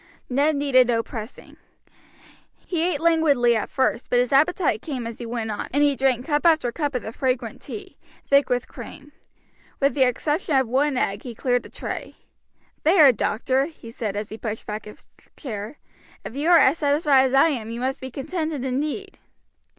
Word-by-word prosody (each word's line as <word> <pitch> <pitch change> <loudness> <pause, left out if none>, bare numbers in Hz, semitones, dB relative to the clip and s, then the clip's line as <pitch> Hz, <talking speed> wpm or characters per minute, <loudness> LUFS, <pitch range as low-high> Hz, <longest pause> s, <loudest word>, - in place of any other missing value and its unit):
Ned 290 +4 +2
needed 275 -3 +4
no 230 -2 +1
pressing. 225 0 -9 1.1
He 345 -3 -2
ate 345 -3 0
languidly 300 -8 +3
at 215 - -2
first; 260 -2 0
but 245 - +2
his 245 +2 +1
appetite 295 - +2
came 260 -6 -5
as 230 -1 -7
he 235 - -6
went 225 -2 -3
on, 205 - -4
and 285 +2 +2
he 285 -1 +3
drank 260 -2 +1
cup 295 -1 0
after 315 -8 +3
cup 290 +1 -3
of 250 - -2
the 220 - -6
fragrant 250 -3 -2
tea, 390 -3 -9 0.3
thick 280 0 +3
with 245 0 0
cream. 290 0 -11 0.7
With 275 0 +2
the 285 - -2
exception 295 +5 +1
of 265 -2 +3
one 270 +3 +1
egg, 200 -3 -1
he 240 -3 -8
cleared 245 +1 0
the - - -13
tray. - - -6 0.7
"There, 310 -4 +6
doctor!" 255 +4 0
he 270 -8 -12
said, 220 -4 -4
as 210 0 -4
he 220 - -8
pushed 220 -1 -5
back 210 0 -5
his 210 - -13 0.3
chair; 220 0 -6 0.5
"if 230 - -7
you 295 +4 0
are 350 - +8
as 295 +3 +4
satisfied 285 -2 +3
as 265 0 0
I 275 +4 +6
am 235 -7 -3
you 230 +1 -5
must 260 +2 -2
be 260 - -6
contented 300 +1 -4
indeed." 300 +10 -3
265 Hz, 190 wpm, -23 LUFS, 235-295 Hz, 1.1 s, are